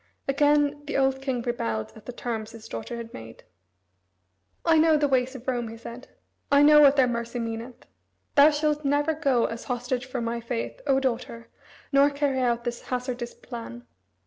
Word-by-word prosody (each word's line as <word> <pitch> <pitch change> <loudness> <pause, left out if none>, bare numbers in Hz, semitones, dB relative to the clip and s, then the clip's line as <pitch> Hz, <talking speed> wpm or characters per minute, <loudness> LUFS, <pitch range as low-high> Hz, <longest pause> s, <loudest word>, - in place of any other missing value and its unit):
Again 290 +1 +2
the - - -1
old 265 0 +1
king 260 -3 -2
rebelled 115 - -3
at 220 - -15
the - - -4
terms 225 -2 -5
his 225 -1 -11
daughter 115 - -6
had 230 -1 -8
made. 115 0 -11 1.2
"I 325 -1 +5
know 315 -1 +5
the 290 -1 +2
ways 260 0 +1
of 260 0 -10
Rome," 245 -2 -1
he 225 +1 -8
said. 235 +2 -10 0.4
"I 285 0 +6
know 300 0 +8
what 280 -1 +7
their 265 -3 +4
mercy 235 0 -3
meaneth. 230 +1 -5 0.5
Thou 285 +1 +7
shalt 300 0 0
never 290 +3 +1
go 275 -6 +1
as 230 0 -5
hostage 250 0 -3
for 260 -1 -4
my 235 0 -2
faith, 115 - -4
O 270 -1 +4
daughter, 230 -3 -3 0.4
nor 280 0 +5
carry 280 -2 -1
out 240 -2 +1
this 240 0 -4
hazardous 250 -1 -4
plan." 175 - -9
250 Hz, 180 wpm, -26 LUFS, 235-280 Hz, 1.2 s, know